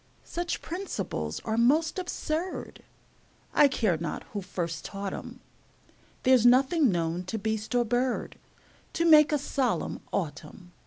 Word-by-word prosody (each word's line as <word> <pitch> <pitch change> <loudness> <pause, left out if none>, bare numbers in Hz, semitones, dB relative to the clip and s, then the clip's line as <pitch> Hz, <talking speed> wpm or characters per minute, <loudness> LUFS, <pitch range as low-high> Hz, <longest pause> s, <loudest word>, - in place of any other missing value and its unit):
Such 345 0 -3
principles 370 +4 -4
are 220 0 0
most 310 +9 +3
absurd, 355 -1 -4 0.7
I 295 - +6
care 215 - +1
not 160 0 -4
who 205 - -3
first 175 -3 -4
taught 195 -1 -5
'em; - - -8 0.8
There's 255 -3 +5
nothing 260 - +5
known 170 0 -1
to 220 +5 -3
beast 220 +2 -2
or 240 -1 +3
bird 245 +3 -1 0.5
To 335 - 0
make 305 -2 +7
a 300 - +3
solemn 270 -3 -1
autumn. 165 +1 -5
245 Hz, 135 wpm, -28 LUFS, 195-300 Hz, 0.8 s, make